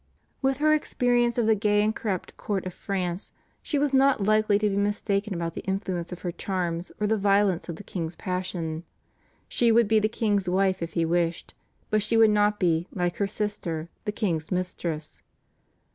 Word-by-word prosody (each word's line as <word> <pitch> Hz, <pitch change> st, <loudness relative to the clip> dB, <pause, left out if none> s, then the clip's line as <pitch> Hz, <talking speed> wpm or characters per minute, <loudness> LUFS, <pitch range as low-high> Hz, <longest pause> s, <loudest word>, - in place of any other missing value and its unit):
With 270 Hz, -1 st, +1 dB
her 305 Hz, +1 st, +4 dB
experience 245 Hz, -5 st, +1 dB
of 235 Hz, -, +2 dB
the 220 Hz, -, +5 dB
gay 210 Hz, 0 st, +2 dB
and 215 Hz, +1 st, +1 dB
corrupt 195 Hz, -5 st, -3 dB
court 195 Hz, -3 st, -3 dB
of 185 Hz, -, -5 dB
France, 185 Hz, -1 st, -3 dB, 0.3 s
she 295 Hz, -, -2 dB
was 285 Hz, -1 st, +1 dB
not 270 Hz, -1 st, +4 dB
likely 215 Hz, 0 st, +3 dB
to 210 Hz, +1 st, +1 dB
be 200 Hz, -, 0 dB
mistaken 205 Hz, 0 st, 0 dB
about 170 Hz, -1 st, -3 dB
the -, -, -5 dB
influence 190 Hz, -3 st, -3 dB
of 180 Hz, -, -8 dB
her 175 Hz, -, -1 dB
charms 175 Hz, -2 st, -3 dB
or 210 Hz, -, +1 dB
the 220 Hz, +1 st, +1 dB
violence 200 Hz, -3 st, +2 dB
of 170 Hz, -, -3 dB
the 205 Hz, -, -10 dB
king's 170 Hz, -3 st, -4 dB
passion. 180 Hz, -3 st, -3 dB, 0.6 s
She 235 Hz, -1 st, +3 dB
would 230 Hz, -1 st, +5 dB
be 220 Hz, +1 st, +4 dB
the 215 Hz, +1 st, +1 dB
king's 205 Hz, -5 st, 0 dB
wife 190 Hz, 0 st, +1 dB
if 170 Hz, -1 st, -4 dB
he 165 Hz, -1 st, +1 dB
wished; 170 Hz, 0 st, -1 dB, 0.4 s
but 215 Hz, 0 st, +3 dB
she 220 Hz, +2 st, +1 dB
would 225 Hz, -1 st, +6 dB
not 210 Hz, 0 st, +2 dB
be, 170 Hz, -1 st, +1 dB
like 175 Hz, -2 st, -1 dB
her 200 Hz, -, +1 dB
sister, 185 Hz, -6 st, -3 dB, 0.2 s
the 210 Hz, -, 0 dB
king's 170 Hz, -8 st, -2 dB
mistress. 175 Hz, -4 st, -3 dB
200 Hz, 190 wpm, -26 LUFS, 175-215 Hz, 0.6 s, would